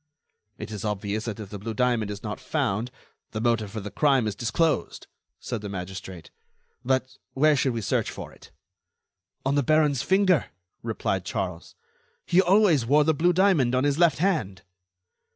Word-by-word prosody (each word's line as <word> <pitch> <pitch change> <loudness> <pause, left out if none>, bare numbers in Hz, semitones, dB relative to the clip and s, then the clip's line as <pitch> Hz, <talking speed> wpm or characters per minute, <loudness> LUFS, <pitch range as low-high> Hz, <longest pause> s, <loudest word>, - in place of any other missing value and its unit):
"It 110 +1 -7
is 105 -3 -6
obvious 105 +1 -2
that 110 -2 -5
if 105 -3 -8
the 105 - -6
blue 110 +2 -5
diamond 120 -3 +1
is 100 -1 -7
not - - -5
found, 110 +5 -1 0.4
the 110 - -2
motive 115 -2 0
for 110 +2 -6
the 105 +1 -7
crime 135 -5 +2
is 105 - -1
disclosed," 120 - -1 0.3
said 115 - -5
the 105 - -6
magistrate. 95 -2 -7 0.5
"But 130 0 -1 0.2
where 150 +2 +4
should 130 -2 +1
we 115 - -3
search - - 0
for - - -8
it?" - - -17 1.0
"On 135 - +1
the 145 - +3
baron's 150 -1 +2
finger," 190 -5 +3 0.4
replied - - -2
Charles. 90 -3 -5 0.5
"He 180 - +4
always 190 - +4
wore 145 +6 +4
the 160 +2 +2
blue 170 +4 +2
diamond 170 -9 +3
on 130 - +2
his 145 +1 +1
left 170 -5 +4
hand." 155 - -1
125 Hz, 170 wpm, -25 LUFS, 105-155 Hz, 1.0 s, where